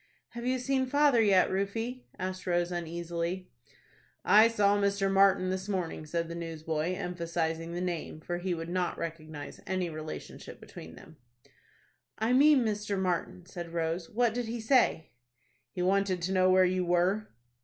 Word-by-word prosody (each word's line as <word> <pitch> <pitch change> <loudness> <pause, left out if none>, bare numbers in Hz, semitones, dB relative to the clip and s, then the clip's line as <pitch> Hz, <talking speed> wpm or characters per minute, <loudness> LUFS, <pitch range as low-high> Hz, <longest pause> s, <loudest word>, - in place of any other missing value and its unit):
"Have 240 0 -6
you 255 0 +1
seen 260 +1 0
father 285 -3 +4
yet, 195 -4 +4
Rufie?" 225 +6 -3
asked 185 0 -5
Rose, 175 0 +1
uneasily. 170 +1 -4 0.7
"I 215 +2 +7
saw 205 -3 +3
Mr. 200 -1 +1
Martin 195 -1 +4
this 190 +2 -4
morning," 175 -5 -3
said 170 +1 -2
the 170 - -6
newsboy, 165 0 -3
emphasizing 170 -2 -3
the 175 - -3
name, 175 -3 -4
for 175 +2 -4
he 180 0 -2
would 165 0 -6
not 180 0 -1
recognize 155 -3 -7
any 185 -2 -1
relationship 155 0 -8
between 80 0 -11
them. 160 - -15 1.0
"I 225 +3 +1
mean 275 -1 +5
Mr. 210 -2 -2
Martin," 185 -1 -2
said 175 -2 -8
Rose. 165 +1 -2
"What 235 0 +1
did 245 0 -2
he 235 +1 -4
say?" 220 - +2 0.6
"He 180 +8 -4
wanted 195 0 +1
to 185 - -1
know 185 -1 +3
where 185 0 +5
you 185 0 +1
were." 180 +4 +1
185 Hz, 160 wpm, -30 LUFS, 170-205 Hz, 1.0 s, I